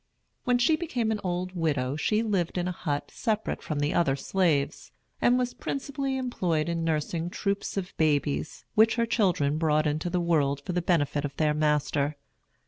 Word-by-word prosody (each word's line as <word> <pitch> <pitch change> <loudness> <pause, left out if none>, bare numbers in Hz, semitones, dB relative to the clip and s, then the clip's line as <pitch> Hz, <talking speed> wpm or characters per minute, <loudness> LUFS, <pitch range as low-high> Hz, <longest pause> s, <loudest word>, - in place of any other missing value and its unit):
When 245 -1 +3
she 245 +6 +4
became 250 -9 -1
an 215 - -1
old 180 0 -2
widow 145 -6 0
she 210 +8 +1
lived 190 -6 0
in 175 0 0
a - - -1
hut 145 -4 -3
separate 220 -1 -1
from 155 - -3
the 145 +1 0
other 165 -6 +2
slaves, 155 -2 0 0.3
and 245 +1 +4
was 250 -1 -1
principally 275 -1 -3
employed 180 -11 -1
in 170 -1 -1
nursing 165 +1 -1
troops 200 +2 -2
of 185 -2 -4
babies, 150 -1 0
which 220 +1 +5
her 235 -1 +2
children 175 -10 +1
brought 155 -1 +2
into 155 +3 -1
the 180 +1 0
world 150 -5 +2
for 180 - -2
the 180 - +1
benefit 150 -4 +1
of 145 -2 -4
their 155 -1 +2
master. 150 -1 +1
170 Hz, 180 wpm, -27 LUFS, 150-210 Hz, 0.3 s, which